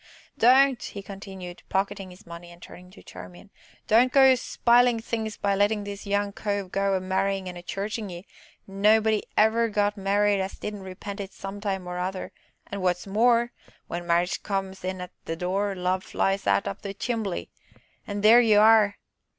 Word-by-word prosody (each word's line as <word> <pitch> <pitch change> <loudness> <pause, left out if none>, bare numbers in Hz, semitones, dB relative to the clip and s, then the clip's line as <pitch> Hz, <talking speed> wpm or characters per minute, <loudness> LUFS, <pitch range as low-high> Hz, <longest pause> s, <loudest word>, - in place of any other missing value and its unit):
"Don't," 260 +1 +5
he 200 - -7
continued, 190 -3 -9
pocketing 195 0 -2
the 180 - -13
money, 170 0 -10
and 170 - -15
turning 180 +1 -13
to 185 - -16
Charmian, 185 +3 -12 0.3
"don't 240 +4 +4
go 265 -1 +7
spilin' 240 -1 +3
things 220 -1 -4
by 200 0 0
lettin' 205 +1 +1
this 200 0 -8
young 200 0 0
cove 200 -3 -3
go 195 0 +1
a - - +1
marryin' 190 +1 -1
an' 180 - -6
a 175 - -8
churchin' 205 +3 -4
ye 175 +1 -9 0.4
nobody 215 +2 +3 0.2
never 225 +2 +3
got 205 0 0
married 200 0 +2
as 190 +1 -5
didn't 210 -1 -6
repent 190 +2 -8
it 195 -1 -6
some 195 +1 -8
time 195 -3 -3
or 180 0 -5
other, 185 +1 -4 0.3
an' 200 -1 -6
wot's 180 -1 0
more, 235 +4 +2 0.3
when 175 0 -6
Marriage 175 +1 +1
comes 195 -2 -4
in 185 0 -4
at 180 - -7
the 165 - -3
door, 195 +4 -1
Love 185 +1 -1
flies 195 0 -1
out 100 0 +2
up 100 - -5
the 200 0 -6
chimbley 220 -5 -3 0.6
an' 205 0 -4
there 225 +3 +7
y'are! 215 -2 +5
200 Hz, 175 wpm, -26 LUFS, 185-215 Hz, 0.6 s, go